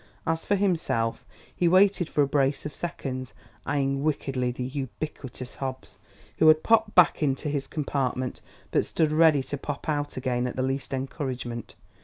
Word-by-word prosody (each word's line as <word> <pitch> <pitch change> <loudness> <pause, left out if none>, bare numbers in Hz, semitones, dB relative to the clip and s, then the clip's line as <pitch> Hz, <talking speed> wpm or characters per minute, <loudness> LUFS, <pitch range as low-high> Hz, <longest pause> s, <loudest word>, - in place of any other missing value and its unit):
As 165 0 -1
for 205 - +3
himself, 165 - 0 0.3
he 175 - +2
waited 185 -1 +4
for 145 - +3
a - - +1
brace 140 0 +1
of 150 - -5
seconds, 130 -7 -5 0.3
eying 140 -1 0
wickedly 135 -4 0
the 125 +1 -4
ubiquitous 130 -1 -6
Hobbs, 130 -7 -6 0.4
who 160 - +6
had 155 0 +6
popped 225 -2 +3
back 180 -3 +6
into 145 +1 0
his 140 -1 -2
compartment, 130 -4 -2 0.3
but - - +3
stood 155 -2 0
ready 155 -3 +5
to 145 +1 -5
pop 145 0 -5
out 145 -3 -1
again 125 -1 0
on 125 - -4
the 130 - -1
least 135 0 -2
encouragement. 130 -3 -4
140 Hz, 165 wpm, -27 LUFS, 130-155 Hz, 0.4 s, who